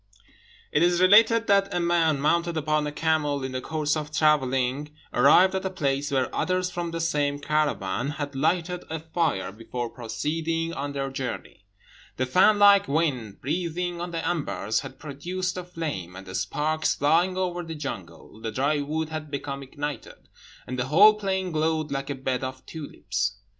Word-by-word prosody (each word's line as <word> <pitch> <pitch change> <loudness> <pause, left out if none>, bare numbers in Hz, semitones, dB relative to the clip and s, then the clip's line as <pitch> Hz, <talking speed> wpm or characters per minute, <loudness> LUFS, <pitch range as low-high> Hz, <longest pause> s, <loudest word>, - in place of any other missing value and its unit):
It 150 - +2
is 175 0 +3
related 225 +5 +6
that 200 -1 +3
a 180 - 0
man, 170 -4 +2
mounted 170 +3 +1
upon 155 -1 0
a - - -3
camel, 150 -3 0
in 130 - -3
the 130 0 -3
course 155 +1 -1
of 150 -1 -4
travelling 145 -1 +1 0.2
arrived 175 +9 +6
at 190 - -1
a 190 - -1
place 145 -6 -1
where 130 -2 0
others 185 0 0
from 175 -1 -3
the 165 0 -4
same 145 -3 0
caravan 140 -7 -1
had 145 -1 -4
lighted 175 +5 0
a 160 0 -3
fire 160 - -1
before 115 +3 -5
proceeding 165 +7 -2
on 145 0 -4
their 135 -1 -3
journey. 125 -6 -6 0.5
The 130 - +1
fan 185 +10 +5
like 200 -1 +6
wind, 135 -9 -1
breathing 175 +3 -2
on 175 - -3
the 165 -1 -3
embers, 140 - -1
had 130 - -9
produced 175 +6 -4
a 180 - -4
flame; 150 - -5
and 95 +1 -9
the 95 - -9
sparks, 155 +11 0
flying 170 +6 +2
over 180 -1 -1
the 165 -1 -6
jungle, 110 - -7
the 110 0 -3
dry 140 +6 +1
wood 155 +2 -2
had 155 -1 -5
become 140 -1 -4
ignited, 145 -1 -7 0.4
and 125 +1 -5
the 125 - 0
whole 200 +9 +7
plain 190 -3 -2
glowed 155 -1 0
like 135 0 -3
a 140 - -2
bed 130 -1 -2
of 130 0 -6
tulips. 100 - -3
150 Hz, 175 wpm, -26 LUFS, 135-170 Hz, 0.5 s, whole